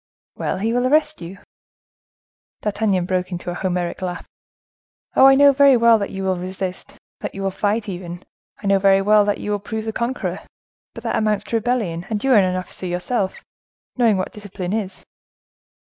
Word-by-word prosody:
"Well, -, -, -2 dB
he 220 Hz, +4 st, -1 dB
will 245 Hz, +1 st, +2 dB
arrest 305 Hz, 0 st, +2 dB
you." 175 Hz, +3 st, -8 dB, 1.2 s
D'Artagnan 205 Hz, -3 st, 0 dB
broke 185 Hz, 0 st, -1 dB
into 175 Hz, 0 st, -4 dB
a -, -, -4 dB
Homeric 180 Hz, -1 st, -2 dB
laugh. 180 Hz, -1 st, -4 dB, 0.9 s
"Oh! 265 Hz, -, +8 dB
I 270 Hz, -, +7 dB
know 285 Hz, +1 st, +7 dB
very 275 Hz, -1 st, +5 dB
well 230 Hz, -1 st, +5 dB
that 200 Hz, -, -3 dB
you 195 Hz, 0 st, -5 dB
will 190 Hz, -1 st, 0 dB
resist, 185 Hz, +1 st, -6 dB, 0.2 s
that -, -, -6 dB
you 195 Hz, -, -5 dB
will 195 Hz, -, 0 dB
fight, 210 Hz, +3 st, -1 dB
even; 175 Hz, -2 st, -6 dB, 0.4 s
I -, -, -6 dB
know 195 Hz, 0 st, +3 dB
very 195 Hz, 0 st, +4 dB
well 210 Hz, +1 st, +5 dB
that 205 Hz, 0 st, 0 dB
you 210 Hz, -, -4 dB
will 205 Hz, -, 0 dB
prove 220 Hz, +2 st, -5 dB
the 220 Hz, -, -3 dB
conqueror; 235 Hz, +4 st, -2 dB, 0.6 s
but -, -, -9 dB
that -, -, -1 dB
amounts 210 Hz, -2 st, +1 dB
to 230 Hz, -, -4 dB
rebellion, 215 Hz, -7 st, -1 dB
and 215 Hz, -2 st, -2 dB
you 270 Hz, -, +2 dB
are 245 Hz, -, +7 dB
an 185 Hz, -1 st, +1 dB
officer 185 Hz, 0 st, -6 dB
yourself, 190 Hz, +3 st, -2 dB, 0.5 s
knowing 230 Hz, -5 st, +3 dB
what 185 Hz, -, -3 dB
discipline 195 Hz, -3 st, -6 dB
is." 200 Hz, -4 st, -4 dB
200 Hz, 190 wpm, -21 LUFS, 185-225 Hz, 1.2 s, Oh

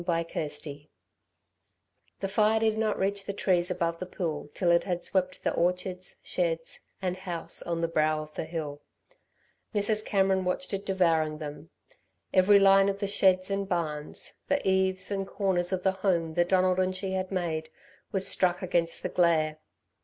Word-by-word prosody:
CHAPTER 165 Hz, -2 st, -1 dB
XV -, -, 0 dB, 1.6 s
The 195 Hz, -, -1 dB
fire 215 Hz, +2 st, +2 dB
did 220 Hz, -1 st, +1 dB
not 220 Hz, 0 st, 0 dB
reach 195 Hz, +1 st, 0 dB
the 200 Hz, -, -4 dB
trees 180 Hz, -3 st, +1 dB
above 170 Hz, -2 st, -1 dB
the 185 Hz, -, -5 dB
pool 160 Hz, -5 st, -4 dB
till 175 Hz, -3 st, +2 dB
it 170 Hz, -, +4 dB
had 175 Hz, -2 st, -3 dB
swept 185 Hz, -1 st, -1 dB
the -, -, 0 dB
orchards, 180 Hz, +1 st, -1 dB
sheds, 165 Hz, -2 st, -2 dB, 0.2 s
and 180 Hz, -1 st, -1 dB
house 180 Hz, -3 st, 0 dB
on 170 Hz, -1 st, -3 dB
the 165 Hz, -, +1 dB
brow 155 Hz, -1 st, +1 dB
of 155 Hz, 0 st, -14 dB
the -, -, -4 dB
hill. 155 Hz, -3 st, -5 dB, 0.9 s
Mrs. 210 Hz, +1 st, +2 dB
Cameron 190 Hz, -2 st, +1 dB
watched 180 Hz, +1 st, -2 dB
it 195 Hz, +1 st, -4 dB
devouring 165 Hz, -5 st, +1 dB
them. 150 Hz, 0 st, -8 dB, 0.6 s
Every 190 Hz, +2 st, +6 dB
line 195 Hz, 0 st, +5 dB
of 195 Hz, -, -2 dB
the 200 Hz, -, -2 dB
sheds 190 Hz, -1 st, +3 dB
and 195 Hz, 0 st, -2 dB
barns, 155 Hz, -5 st, -3 dB
the 285 Hz, -6 st, 0 dB
eaves 190 Hz, 0 st, +2 dB
and 195 Hz, -1 st, -2 dB
corners 185 Hz, -3 st, 0 dB
of 185 Hz, -1 st, -2 dB
the 190 Hz, -, +3 dB
home 180 Hz, -4 st, 0 dB
that 175 Hz, +1 st, +1 dB
Donald 185 Hz, -1 st, +3 dB
and 185 Hz, 0 st, +1 dB
she 190 Hz, 0 st, -3 dB
had 185 Hz, 0 st, -2 dB
made, 160 Hz, -4 st, -2 dB, 0.4 s
was 195 Hz, -2 st, +3 dB
struck 185 Hz, -1 st, +2 dB
against 170 Hz, -2 st, 0 dB
the -, -, -2 dB
glare. 160 Hz, -3 st, +2 dB
185 Hz, 175 wpm, -28 LUFS, 165-195 Hz, 1.6 s, Every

